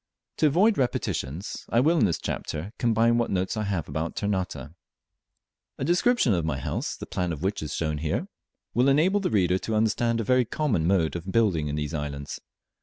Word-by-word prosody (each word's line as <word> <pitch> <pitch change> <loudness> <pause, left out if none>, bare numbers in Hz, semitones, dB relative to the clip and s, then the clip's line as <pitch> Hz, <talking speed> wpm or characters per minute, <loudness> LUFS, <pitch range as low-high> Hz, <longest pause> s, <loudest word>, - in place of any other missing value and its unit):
To 155 - +4
avoid 190 +7 +3
repetitions, 90 - -2
I 115 - +3
will 160 +6 +3
in 110 - +5
this 85 -5 +1
chapter 80 +7 -4
combine 115 0 +3
what 120 - 0
notes 95 +2 -1
I 110 -1 -2
have 95 -6 -2
about 80 +3 -3
Ternate. 90 -9 -2 1.1
A - - -2
description 175 - +3
of 85 -3 0
my 75 -4 -1
house 65 - -3
(the - - -7
plan 90 -1 -2
of 80 0 -5
which 100 +2 -1
is 75 -1 -4
here 75 -2 -1
shown) - - -1 0.5
will 125 +4 +3
enable 170 +9 +3
the 195 - -1
reader 95 -3 +2
to 110 - -3
understand 115 +2 +1
a - - 0
very 125 +3 +3
common 110 - 0
mode 85 -4 +2
of 85 +2 -5
building 95 -10 +2
in 75 - -2
these 75 0 -3
islands. 70 -2 -4
100 Hz, 195 wpm, -26 LUFS, 80-120 Hz, 1.1 s, in